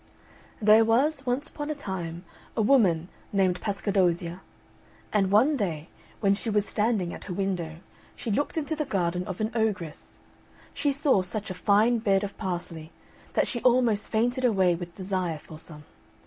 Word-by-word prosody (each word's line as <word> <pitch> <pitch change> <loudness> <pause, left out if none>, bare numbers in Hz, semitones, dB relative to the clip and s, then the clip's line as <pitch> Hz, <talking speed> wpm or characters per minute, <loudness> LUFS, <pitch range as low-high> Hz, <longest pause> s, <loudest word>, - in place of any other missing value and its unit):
There 215 +1 +6
was, 270 +5 +1
once 250 +4 0
upon 295 0 -6
a 305 - -1
time, 180 - -5 0.3
a - - +3
woman 190 -10 +4 0.2
named 190 -3 +1
Pascadozzia, 190 -3 0 0.7
and 195 -3 +3
one 235 +10 +4
day, 170 - -3 0.3
when 200 -2 +4
she 210 +3 -3
was 210 -1 +2
standing 210 -6 0
at - - -9
her 185 - -4
window, 180 -5 -2 0.5
which 215 -3 +1
looked 290 +5 -1
into 315 0 -1
the 305 - -1
garden 180 - -1
of 190 - -5
an 215 +1 0
ogress, 210 -8 -2 0.6
she 285 0 +1
saw 275 -7 +3
such 200 +2 -5
a - - -2
fine 210 +6 +3
bed 195 -2 +2
of 200 -1 -5
parsley 175 -4 -5 0.4
that - - +3
she 240 - -3
almost 240 -4 +3
fainted 245 +4 +1
away 190 -7 +4
with 170 0 -6
desire 185 -4 -2
for 155 +1 -12
some. 150 -2 -10
200 Hz, 165 wpm, -27 LUFS, 180-235 Hz, 0.7 s, There